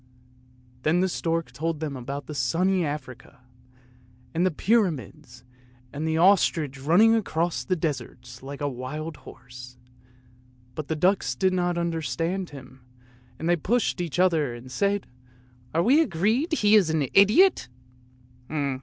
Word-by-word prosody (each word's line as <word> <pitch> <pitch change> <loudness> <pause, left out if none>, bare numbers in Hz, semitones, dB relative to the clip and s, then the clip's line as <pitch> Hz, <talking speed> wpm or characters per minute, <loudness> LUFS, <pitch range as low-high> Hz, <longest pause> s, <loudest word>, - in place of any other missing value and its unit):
" 125 0 -30
Then 160 +6 +2
the 190 - +2
stork 165 -5 -2
told 155 +4 -3
them 150 -3 -4
about 140 +3 -6
sunny 175 +8 +1
Africa, 145 -6 -7 0.9
and 170 +2 +1
the 185 - +3
pyra 200 +4 +2
mids, 130 -1 -11 0.5
and 150 +3 -3
the 160 0 0
ostrich 165 -6 +3
running 180 +10 +5
across 175 -6 -1
the 185 - 0
deserts 155 -4 -5
like 140 +2 -8
a 145 - 0
wild 145 +5 -6
horse; 125 -1 -13 1.0
but 150 +2 -6
the 160 - -2
ducks 185 +5 +1
did 190 -1 +1
not 175 -1 0
understand 170 +2 -2
him, 130 -2 -13 0.6
and 160 - -4
they 175 - +4
pushed 210 +4 0
each 170 -2 -4
other 160 -9 +2
and 125 +2 -11
said, 200 +5 0 0.4
" 125 0 -30
Are 165 - +3
we 275 - +5
agreed 225 - 0
that 315 - -1
he 210 0 +4
is 200 -6 +5
an 155 -3 +1
idiot? 215 - +5
160 Hz, 150 wpm, -25 LUFS, 135-185 Hz, 1.0 s, running